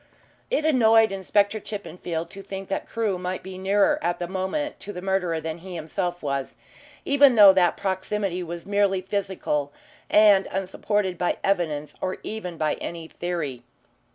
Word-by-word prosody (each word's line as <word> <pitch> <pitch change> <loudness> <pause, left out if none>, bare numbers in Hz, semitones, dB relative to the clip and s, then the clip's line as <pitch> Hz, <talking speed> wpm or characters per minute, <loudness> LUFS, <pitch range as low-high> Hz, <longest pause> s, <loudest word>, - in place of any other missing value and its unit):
It 395 -11 0
annoyed 225 -7 +5
Inspector 200 +2 +1
Chippenfield 180 -5 -5
to 195 - -8
think 195 0 -7
that 195 - -3
Crewe 215 -5 -1
might 180 +1 -4
be 185 0 -8
nearer 205 +10 +3
at 175 -10 0
the 175 - -4
moment 190 - -3
to 205 - -7
the 180 - -7
murderer 180 -3 0
than 160 +1 -5
he 180 +1 -8
himself 175 +2 -3
was, 140 -2 -2 0.5
even 280 -2 +5
though 205 -3 +9
that 180 -2 +3
proximity 190 -1 -2
was 170 -1 -6
merely 200 -2 +2
physical 185 -7 -2 0.4
and 210 -2 +6
unsupported 195 0 -1
by 175 - 0
evidence 155 -6 0
or 185 0 -2
even 180 -6 -5
by 155 -1 +1
any 165 -1 -6
theory. 165 -8 -4
190 Hz, 155 wpm, -25 LUFS, 175-205 Hz, 0.5 s, though